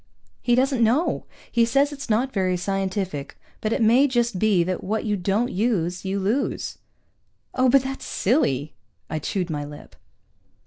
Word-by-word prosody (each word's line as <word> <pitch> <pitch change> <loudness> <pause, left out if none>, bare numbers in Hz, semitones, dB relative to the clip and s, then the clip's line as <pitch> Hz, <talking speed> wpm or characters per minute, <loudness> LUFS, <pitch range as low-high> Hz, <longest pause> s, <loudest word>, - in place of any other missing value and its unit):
"He 240 - +3
doesn't 260 -1 +2
know. 250 +10 +1 0.2
He 235 - +3
says 275 +5 +2
it's 280 -3 -8
not 245 +5 +1
very 185 -3 +1
scientific, 190 -5 -3 0.2
but 215 - -1
it 230 - +1
may 245 +6 +5
just 240 -6 0
be 205 -4 +3
that 180 +1 -3
what 215 +4 -2
you 210 -1 +1
don't 200 +6 0
use, 185 -4 -1
you 195 +1 -1
lose." 220 +9 -1 0.7
"Oh, 255 0 +3
but 270 +1 +5
that's 270 0 -5
silly." 155 - +1 0.4
I 155 - -1
chewed 180 +2 -2
my 145 -1 -2
lip. 145 0 -11
215 Hz, 165 wpm, -24 LUFS, 185-245 Hz, 0.7 s, may